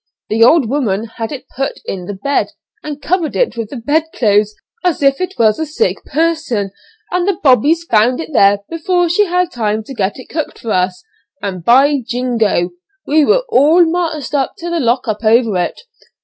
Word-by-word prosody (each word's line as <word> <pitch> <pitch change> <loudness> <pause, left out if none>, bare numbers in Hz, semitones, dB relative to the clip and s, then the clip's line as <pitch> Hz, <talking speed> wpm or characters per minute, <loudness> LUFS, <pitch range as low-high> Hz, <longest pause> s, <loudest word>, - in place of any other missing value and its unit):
The 225 +2 +3
old 275 +1 +5
woman 220 -6 -1
had 225 -1 -4
it 280 - -7
put 270 0 -1
in 180 -2 -5
the 205 - -5
bed, 280 +9 -1 0.3
and 295 -1 -6
covered 335 +1 -1
it - - +1
with 230 -2 -4
the - - -8
bed 290 +7 0
clothes, 210 -2 +2 0.3
as 350 -5 0
if 275 +3 +3
it 370 +1 -3
was 215 -2 +3
a 320 - -1
sick 380 +10 -1
person; 310 - -1 0.4
and 360 +1 0
the 395 -4 +1
'bobbies' 290 +5 +4
found 240 -3 +2
it 320 -1 -6
there 200 -3 +4
before 350 +1 0
she 415 +5 +3
had 360 -1 0
time 220 -2 -2
to 270 - -9
get 200 -4 -2
it 255 - -10
cooked 315 -1 -4
for 225 - -5
us, 180 -1 0 0.4
and, 185 -3 -4
by 270 - +4
jingo! 230 -7 0 0.3
we 305 +1 +3
were - - +3
all 340 - +5
marched 325 -4 -2
up 275 -2 0
to 345 -2 -5
the 340 - 0
'lock 245 -1 0
up' 215 +1 -3
over 225 -1 +3
it. 175 - -2
270 Hz, 195 wpm, -15 LUFS, 220-330 Hz, 0.4 s, old